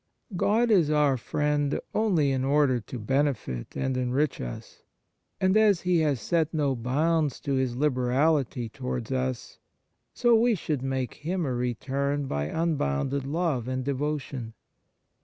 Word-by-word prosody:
God 225 +6 +2
is 175 -8 +4
our 150 -3 +3
Friend 145 +3 0
only 180 -10 +2
in 130 -1 0
order 140 -2 +3
to 115 +3 -8
benefit 120 - -1
and 130 -1 -1
enrich 130 +3 0
us; - - -8 0.6
and 190 0 +2
as 210 -5 +4
He 180 -2 +2
has 150 -5 +1
set 160 +7 0
no 145 -3 +1
bounds 145 +5 0
to 140 - -2
His 130 -2 0
liberality 130 -1 +1
towards 125 0 -5
us, 130 -1 -3 0.5
so 240 -1 +3
we 230 0 +4
should 155 -6 -3
make 130 -1 -2
Him 170 +3 -3
a 130 - -1
return 135 +4 -1
by 75 - -2
un 165 -1 0
bounded 130 - -1
love 150 -6 -1
and 130 0 -2
devotion. 140 -4 -3
140 Hz, 145 wpm, -27 LUFS, 125-155 Hz, 0.6 s, is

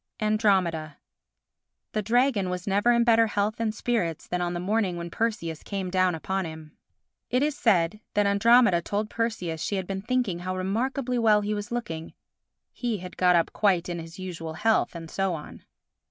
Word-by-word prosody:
Andromeda 190 -8 +1 0.9
The 215 - -1
dragon 225 -2 +2
was 180 0 -4
never 205 +4 +3
in 235 0 +4
better 230 -1 +5
health 210 +1 -1
and 225 -1 0
spirits 215 -7 -2
than 180 0 -2
on 175 0 -1
the - - -2
morning 190 -1 0
when 170 0 -6
Perseus 170 -9 -2
came 195 -3 -4
down 185 -2 +2
upon 190 +4 -2
him. 160 -1 -9 0.5
It 250 +3 +2
is 300 -1 0
said 190 - +2 0.2
that 205 0 +3
Andromeda 200 -2 +5
told 205 +4 -3
Perseus 180 -9 -2
she 205 - -1
had 190 -1 -2
been 195 +1 -4
thinking 235 -5 -1
how 185 +1 -3
remarkably 245 +6 -1
well 215 -2 +4
he 210 +1 -1
was 210 +3 -5
looking. 165 -10 -5 0.6
He 240 -3 -2
had 180 -1 -9
got 180 -1 +4
up 170 - +1
quite 185 -5 +2
in 170 -1 -3
his 165 +1 -9
usual 170 -4 -6
health—and 170 -4 0
so 195 -2 0
on. 150 - -10
195 Hz, 180 wpm, -26 LUFS, 175-225 Hz, 0.9 s, better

